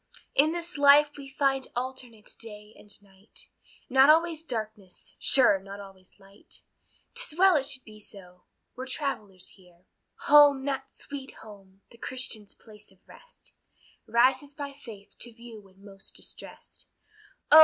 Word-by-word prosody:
In 300 Hz, +3 st, +4 dB
this 340 Hz, -2 st, -3 dB
life 290 Hz, +1 st, +6 dB
we 275 Hz, -1 st, -10 dB
find 270 Hz, -1 st, 0 dB
alternate 245 Hz, -3 st, -6 dB
day 210 Hz, -1 st, -9 dB
and 210 Hz, -, -18 dB
night, 195 Hz, +1 st, -12 dB, 0.4 s
Not 265 Hz, +2 st, +6 dB
always 325 Hz, 0 st, +4 dB
darkness, 215 Hz, -, -7 dB
sure 245 Hz, -7 st, +5 dB
not 195 Hz, +1 st, -10 dB
always 195 Hz, -2 st, -14 dB
light; 195 Hz, +1 st, -16 dB, 0.5 s
'Tis 475 Hz, -10 st, -1 dB
well 380 Hz, -1 st, +6 dB
it 275 Hz, -2 st, +1 dB
should 270 Hz, -2 st, -2 dB
be 215 Hz, -1 st, -14 dB
so, 180 Hz, -3 st, -11 dB, 0.3 s
we're 260 Hz, +1 st, -6 dB
travellers 215 Hz, -9 st, -4 dB
here, 180 Hz, -2 st, -20 dB, 0.4 s
Home, 285 Hz, -2 st, +6 dB
that 270 Hz, -1 st, -3 dB
"sweet 280 Hz, -2 st, -8 dB
home," 195 Hz, -2 st, -15 dB
the 235 Hz, -, -16 dB
Christian's 230 Hz, -6 st, -4 dB
place 210 Hz, -2 st, -17 dB
of 190 Hz, -1 st, -28 dB
rest, -, -, -16 dB, 0.5 s
Rises 260 Hz, +4 st, +2 dB
by 285 Hz, -1 st, -6 dB
faith 225 Hz, -8 st, -13 dB
to 240 Hz, -, -2 dB
view 230 Hz, -2 st, -11 dB
when 195 Hz, 0 st, -21 dB
most 195 Hz, -1 st, -11 dB
distressed: -, -, -9 dB, 0.6 s
Oh! 310 Hz, -, +11 dB
240 Hz, 145 wpm, -28 LUFS, 200-280 Hz, 0.6 s, Oh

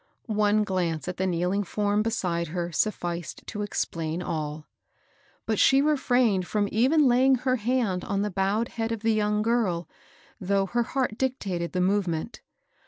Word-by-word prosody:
One 210 Hz, -1 st, +2 dB
glance 175 Hz, -5 st, -2 dB
at 180 Hz, -, -4 dB
the 190 Hz, -, 0 dB
kneeling 180 Hz, +3 st, 0 dB
form 205 Hz, +2 st, 0 dB
beside 180 Hz, -7 st, -1 dB
her 175 Hz, +2 st, -3 dB
sufficed 175 Hz, -2 st, -2 dB
to 210 Hz, -, -5 dB
explain 165 Hz, -5 st, -2 dB
all; 155 Hz, -2 st, -4 dB, 0.8 s
but 220 Hz, -2 st, 0 dB
she 270 Hz, -, +5 dB
refrained 250 Hz, -10 st, +2 dB
from 205 Hz, -1 st, 0 dB
even 270 Hz, +8 st, +3 dB
laying 260 Hz, +2 st, +5 dB
her 255 Hz, +1 st, 0 dB
hand 220 Hz, -5 st, 0 dB
on 200 Hz, 0 st, -1 dB
the 210 Hz, -, -2 dB
boif 195 Hz, +4 st, +1 dB
ed 235 Hz, -, -2 dB
head 225 Hz, -1 st, -3 dB
of 225 Hz, -2 st, -3 dB
the 225 Hz, 0 st, +2 dB
young 210 Hz, 0 st, +1 dB
girl, 210 Hz, -8 st, 0 dB, 0.5 s
though 195 Hz, +1 st, +1 dB
her 240 Hz, +5 st, 0 dB
heart 245 Hz, -2 st, -2 dB
dictated 195 Hz, -10 st, -2 dB
the 180 Hz, -, 0 dB
movement. 185 Hz, 0 st, -1 dB
205 Hz, 165 wpm, -26 LUFS, 180-230 Hz, 0.8 s, she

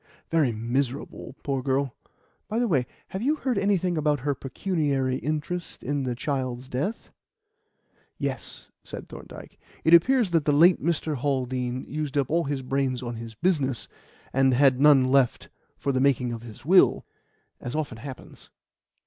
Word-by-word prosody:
"Very 155 Hz, -7 st, +3 dB
miserable, 125 Hz, +4 st, -3 dB
poor 135 Hz, -2 st, -1 dB
girl. 135 Hz, 0 st, 0 dB, 0.5 s
By 220 Hz, -, -2 dB
the 240 Hz, 0 st, +2 dB
way, 135 Hz, -, +1 dB, 0.2 s
have 190 Hz, -, -4 dB
you 290 Hz, +6 st, +2 dB
heard 255 Hz, -8 st, -1 dB
anything 185 Hz, -4 st, +1 dB
about 150 Hz, -3 st, +1 dB
her 145 Hz, +2 st, 0 dB
pecuniary 135 Hz, -2 st, -1 dB
interest 155 Hz, +5 st, -4 dB
in 145 Hz, +2 st, -1 dB
the 125 Hz, -1 st, -2 dB
child's 130 Hz, -2 st, -3 dB
death?" 145 Hz, -, -3 dB, 1.1 s
"Yes," -, -, -5 dB
said -, -, -8 dB
Thorndyke. -, -, -11 dB, 0.2 s
"It 160 Hz, -, +4 dB
appears 230 Hz, +4 st, +5 dB
that 165 Hz, -3 st, +2 dB
the 150 Hz, -, +3 dB
late 170 Hz, +5 st, +6 dB
Mr. 155 Hz, -2 st, 0 dB
Haldean 130 Hz, -2 st, -2 dB
used 150 Hz, -1 st, -3 dB
up 140 Hz, -1 st, 0 dB
all 170 Hz, +1 st, +2 dB
his 140 Hz, -2 st, -2 dB
brains 130 Hz, -1 st, -1 dB
on 120 Hz, -1 st, -4 dB
his 115 Hz, -1 st, -8 dB
business, 140 Hz, -, 0 dB, 0.5 s
and 135 Hz, -1 st, +4 dB
had 135 Hz, -1 st, +4 dB
none 135 Hz, -3 st, +6 dB
left 135 Hz, -3 st, +2 dB, 0.3 s
for 140 Hz, -, -1 dB
the 130 Hz, -1 st, +1 dB
making 130 Hz, -3 st, +2 dB
of 115 Hz, -, -6 dB
his 115 Hz, +1 st, -12 dB
will 185 Hz, +4 st, +5 dB, 0.5 s
as 125 Hz, -, -5 dB
often 145 Hz, -7 st, -3 dB
happens. 130 Hz, +2 st, -10 dB
140 Hz, 155 wpm, -26 LUFS, 130-160 Hz, 1.1 s, late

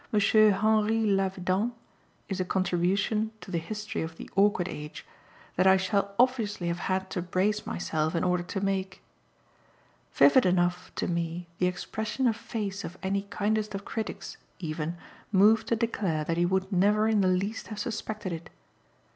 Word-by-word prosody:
Henri 215 Hz, +1 st, +4 dB
Lavedan, 195 Hz, +2 st, +1 dB, 0.5 s
is 195 Hz, -2 st, -3 dB
a -, -, +2 dB
contribution 190 Hz, +4 st, 0 dB
to 190 Hz, -, -10 dB
the 170 Hz, -, 0 dB
history 210 Hz, +5 st, -5 dB
of 160 Hz, 0 st, -5 dB
"The -, -, -8 dB
Awkward 195 Hz, -2 st, +3 dB
Age" 150 Hz, -3 st, -7 dB, 0.5 s
that 185 Hz, +2 st, +4 dB
I 190 Hz, 0 st, +7 dB
shall 200 Hz, +1 st, 0 dB
obviously 225 Hz, -8 st, +1 dB
have 170 Hz, +1 st, -2 dB
had 190 Hz, 0 st, -2 dB
to 180 Hz, -, -2 dB
brace 190 Hz, +4 st, 0 dB
myself 160 Hz, -1 st, -1 dB
in 165 Hz, -, +1 dB
order 180 Hz, -1 st, +2 dB
to 180 Hz, +2 st, -4 dB
make. 195 Hz, -1 st, -2 dB, 1.1 s
Vivid 260 Hz, -7 st, +5 dB
enough 180 Hz, 0 st, +1 dB
to -, -, -1 dB
me 170 Hz, 0 st, -2 dB
the 180 Hz, -, +3 dB
expression 215 Hz, +7 st, -3 dB
of 230 Hz, -3 st, +3 dB
face 200 Hz, -3 st, -4 dB
of 180 Hz, -, -7 dB
any 200 Hz, +1 st, -1 dB
kindest 215 Hz, 0 st, -1 dB
of 195 Hz, -, -6 dB
critics, 220 Hz, -1 st, -5 dB, 0.2 s
even, 160 Hz, 0 st, -4 dB, 0.3 s
moved 215 Hz, +3 st, +5 dB
to 230 Hz, -, +2 dB
declare 200 Hz, -9 st, -1 dB
that 165 Hz, +2 st, -1 dB
he 175 Hz, 0 st, +3 dB
would 190 Hz, +2 st, 0 dB
never 205 Hz, +3 st, +3 dB
in 220 Hz, -2 st, +3 dB
the 190 Hz, -, +3 dB
least 195 Hz, +4 st, -1 dB
have 215 Hz, -, -7 dB
suspected 210 Hz, -3 st, -4 dB
it. 165 Hz, 0 st, -7 dB
195 Hz, 165 wpm, -28 LUFS, 180-215 Hz, 1.1 s, I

